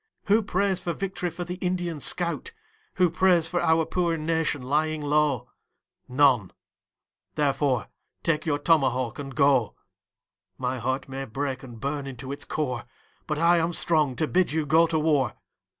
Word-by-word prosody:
Who 210 +2 +4
prays 195 -2 0
for 175 -1 -2
vict'ry 190 -2 -3
for 170 +2 -6
the 180 +1 -6
Indian 175 -3 -2
scout? 175 - -2 0.4
Who 180 - +4
prays 175 -2 +3
for 175 - -1
our 160 0 +3
poor 170 -1 0
nation 160 -3 -1
lying 155 +3 0
low? 145 -4 +1 0.6
None 125 -7 +3 0.8
therefore 140 -4 +1 0.4
take 155 -1 0
your 145 -2 +2
tomahawk 130 -6 +1
and 135 -2 -7
go. 135 -5 +3 0.8
My 130 0 -2
heart 130 +3 -2
may 135 0 -5
break 135 +2 -3
and 120 -4 -11
burn 140 +1 -3
into 130 0 -7
its 140 - -6
core, 125 -6 -3 0.4
But 150 - -1
I 170 +2 +4
am 165 +1 0
strong 155 -6 +2
to 155 - 0
bid 185 +2 +2
you 155 0 0
go 160 +3 +4
to 160 - 0
war. 150 -6 +1
150 Hz, 160 wpm, -26 LUFS, 135-170 Hz, 0.8 s, Who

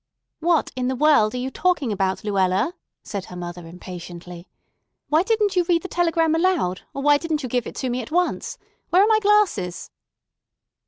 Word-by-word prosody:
"What 330 -1 +1
in 250 -1 -1
the 260 - -1
world 255 -6 +4
are - - -2
you 255 +2 -3
talking 330 -9 0
about, 190 -2 -1
Luella?" 195 - +1 0.3
said 200 -3 -5
her 180 - -11
mother 175 -1 -7
impatiently. 175 0 -10 0.6
"Why 310 +2 +4
didn't 420 0 +1
you 360 - +3
read 335 -1 +1
the - - -4
telegram 330 -3 +1
aloud, 325 - +1
or 275 - -5
why 290 0 +5
didn't 310 -3 -2
you - - -2
give 245 0 -1
it - - -8
to 260 - -3
me 250 +1 -2
at 230 - -9
once? 355 +2 -1 0.3
Where 370 +3 +5
are - - +3
my 440 -1 +4
glasses?" 400 - +1
270 Hz, 190 wpm, -23 LUFS, -, 0.6 s, why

